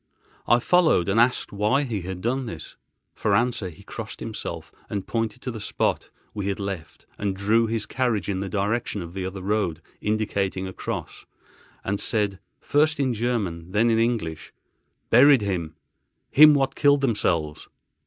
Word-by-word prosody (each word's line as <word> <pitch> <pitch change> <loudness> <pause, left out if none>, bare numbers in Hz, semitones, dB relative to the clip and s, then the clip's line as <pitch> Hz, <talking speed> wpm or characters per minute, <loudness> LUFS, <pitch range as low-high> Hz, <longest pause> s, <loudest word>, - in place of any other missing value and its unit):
I 120 - +6
followed, 160 - +3
and 105 +4 +3
asked 120 +2 +2
why 105 +8 +1
he 115 -7 -3
had 90 +1 -6
done 125 +3 -1
this. 80 -8 -8 0.4
For - - +1
answer 120 -5 0
he 80 - -15
crossed - - -7
himself, - - -6 0.3
pointed 115 0 -3
to 125 - -3
the 110 -2 -7
spot 105 - -1 0.2
we 100 -2 -3
had 100 0 -2
left 100 -5 -6
and 100 -2 -1
drew 110 +4 +2
his 110 -1 -2
carriage 120 -3 -1
in 100 -2 -1
the 95 0 -3
direction 105 +1 -1
of 85 0 -10
the 95 -1 -3
other 95 0 -7
road, 100 -6 0 0.2
indicating 100 -3 -1
a 95 - -6
cross, - - -6 0.6
and 100 +1 -2
said, 100 -3 0 0.2
first 155 +1 +2
in 130 -3 +1
German, 100 -7 -2
then 115 +3 +3
in 110 - +3
English: 110 -10 -1 0.6
"Buried 130 +2 +7
him—him 90 - +2
what 135 -1 +1
killed 145 -1 +3
themselves." 85 - 0
105 Hz, 160 wpm, -24 LUFS, 95-120 Hz, 0.6 s, Buried